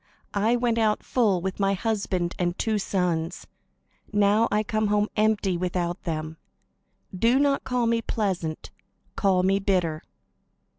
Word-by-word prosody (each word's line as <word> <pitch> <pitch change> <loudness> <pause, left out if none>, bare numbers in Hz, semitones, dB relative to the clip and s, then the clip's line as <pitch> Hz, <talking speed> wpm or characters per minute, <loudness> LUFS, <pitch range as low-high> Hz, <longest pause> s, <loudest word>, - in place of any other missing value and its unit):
I 215 +4 +2
went 240 -1 +1
out 215 -1 +1
full, 210 -8 +1
with 190 +2 -4
my 195 0 +2
husband 190 -4 -1
and 175 0 -1
two 220 -2 0
sons; 180 -3 -1 0.7
now 205 +2 +3
I 210 +1 +2
come 215 0 0
home 210 +1 +1
empty, 210 -4 +1
without 175 +1 -2
them. 160 -1 -4 0.8
Do 230 +7 +3
not 280 0 +2
call 250 -2 0
me 230 0 +1
'Pleasant,' 185 -8 -3 0.4
call 190 -3 +2
me 195 +1 +2
'Bitter.'" 180 -6 0
200 Hz, 140 wpm, -25 LUFS, 180-220 Hz, 0.8 s, now